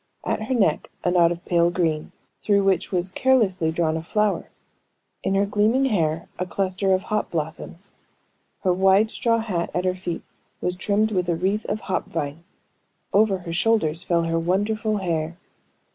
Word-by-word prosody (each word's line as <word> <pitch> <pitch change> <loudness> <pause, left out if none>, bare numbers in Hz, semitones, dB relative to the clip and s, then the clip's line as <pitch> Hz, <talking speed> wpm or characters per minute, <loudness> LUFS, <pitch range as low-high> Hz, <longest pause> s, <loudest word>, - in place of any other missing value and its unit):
At - - -1
her 260 - 0
neck 195 -10 +1
a 175 - +2
knot 175 -1 +4
of 175 0 -6
pale 170 -1 +3
green, 165 -3 -1 0.3
through 200 -1 +3
which 190 -2 +1
was 185 0 -1
carelessly 195 -10 +2
drawn 160 -1 0
a 160 - -2
flower; 210 +5 0 0.7
in 195 - +1
her 200 +1 +3
gleaming 215 +6 +2
hair 165 -9 0
a 180 - 0
cluster 190 +1 -1
of 190 0 +2
hop 215 +1 -1
blossoms; 165 +3 -5 0.7
her 185 -2 +3
wide 195 +4 +4
straw 230 -1 +1
hat 195 -7 -2
at 180 - 0
her 185 - +2
feet 180 -2 -5 0.4
was 180 - -2
trimmed 210 +3 +1
with 180 -3 0
a 170 - +2
wreath 195 +5 -1
of 215 - -2
hop 190 - -2
vine; 145 +3 -4 0.7
over 205 -1 +4
her 170 - -4
shoulders 175 -4 +2
fell 170 -1 +1
her 165 0 0
wonderful 210 +5 0
hair. 165 -3 -2
185 Hz, 175 wpm, -23 LUFS, 170-205 Hz, 0.7 s, knot